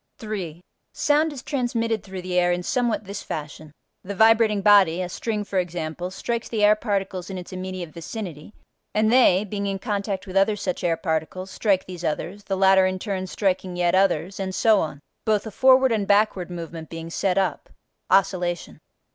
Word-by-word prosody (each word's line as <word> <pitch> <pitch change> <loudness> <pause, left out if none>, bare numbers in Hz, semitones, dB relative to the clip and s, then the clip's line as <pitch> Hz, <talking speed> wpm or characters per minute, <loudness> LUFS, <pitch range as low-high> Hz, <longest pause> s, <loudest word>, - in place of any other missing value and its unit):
3. 195 -8 -5 0.3
Sound 300 +2 +2
is 270 -3 -8
transmitted 235 -5 -1
through 190 -2 -8
the 185 0 -5
air 175 0 +3
in 175 0 -1
somewhat 240 +1 0
this 200 0 -6
fashion: 155 0 -7 0.3
the 200 +2 -6
vibrating 220 0 +4
body 195 -5 +5
(a 180 - -2
string 210 +3 -3
for 195 -2 -1
example) 175 0 -4
strikes 235 +5 -4
the 215 -3 -1
air 210 +1 +6
particles 195 -4 -3
in 190 - -5
its 180 0 -8
immediate 185 -2 -5
vicinity, 170 -1 -7 0.4
and 215 +2 +3
they, 210 -7 +5
being 200 0 -3
in 195 0 -2
contact 200 -2 -3
with 190 -1 -9
other 195 +2 +3
such 185 -3 -3
air 165 -1 +1
particles, 180 +3 -3
strike 195 -4 +1
these 180 -2 -8
others, 185 +5 -3
the 195 - -2
latter 190 0 +5
in 185 0 -2
turn 190 -1 -3
striking 185 -1 -1
yet 175 -1 +1
others, 190 -1 +1
and 190 -1 -3
so 220 -3 +4
on, 155 -4 -3 0.2
both 215 -1 +1
a 220 - -6
forward 260 +2 +5
and 210 -3 0
backward 200 -3 +2
movement 165 -2 -7
being 165 0 -7
set 185 +1 0
up 195 - -1 0.4
(oscillation). 180 -3 +1
190 Hz, 185 wpm, -24 LUFS, 180-210 Hz, 0.4 s, air